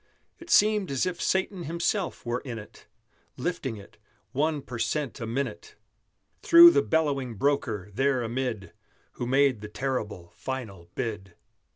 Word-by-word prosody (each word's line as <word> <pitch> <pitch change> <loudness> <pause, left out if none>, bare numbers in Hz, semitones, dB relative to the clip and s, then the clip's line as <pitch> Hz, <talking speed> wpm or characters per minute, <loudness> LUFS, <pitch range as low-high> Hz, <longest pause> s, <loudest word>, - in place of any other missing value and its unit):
It 340 0 -13
seemed 210 - +4
as 135 +2 0
if 180 -1 -3
Satan 190 -1 0
himself 170 - -2
were 120 +1 -1
in 125 -4 -7
it: 105 - -12 0.5
Lifting 150 -10 -3
it 100 - -14 0.3
one 145 +2 0
per 120 -2 -7
cent 145 0 -2
a 115 - -4
minute 140 - -4 0.7
Through 340 0 +9
the - - +3
bellowing 140 -7 0
broker, 110 -6 -1
there 135 +1 +1
amid, 115 -6 -3 0.4
Who 120 - -5
made 135 -3 +3
the 105 - -6
terrible, 105 -8 -4
final 105 -10 -6
bid! 105 -7 -4
130 Hz, 145 wpm, -27 LUFS, 115-160 Hz, 0.7 s, Through